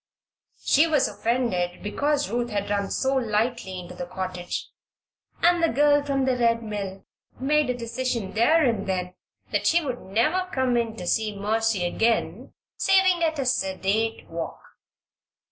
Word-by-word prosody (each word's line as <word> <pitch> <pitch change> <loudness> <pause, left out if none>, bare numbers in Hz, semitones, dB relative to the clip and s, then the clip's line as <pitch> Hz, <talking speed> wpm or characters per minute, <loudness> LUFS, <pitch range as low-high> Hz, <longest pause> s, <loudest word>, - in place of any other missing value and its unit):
She 305 +4 +4
was 300 -4 +3
offended 205 -5 -1
because 285 +7 0
Ruth 240 0 -1
had 205 -2 -2
run 200 -1 0
so 265 0 0
lightly 220 -4 -1
into 180 0 -9
the 175 -1 -6
cottage 180 -1 -5 0.7
and 350 0 +4
the 330 - +3
girl 290 +2 +4
from 275 -2 0
the 260 -1 +2
Red 230 -1 +2
Mill 200 -3 -5 0.3
made 295 +1 +2
a 250 - -1
decision 235 -3 -3
there 305 +8 +4
and 225 -6 0
then 180 -1 -2 0.4
that - - 0
she 335 -1 +3
would 250 -3 -3
never 305 - 0
come 260 -2 +1
in 230 -2 0
to 180 - -7
see 210 +2 0
Mercy 215 -2 0
again 225 +6 0 0.3
saving 380 -2 +3
at 320 -1 +1
a 275 - -1
sedate 215 -1 0
walk. 165 0 -5
230 Hz, 155 wpm, -25 LUFS, 200-275 Hz, 0.7 s, She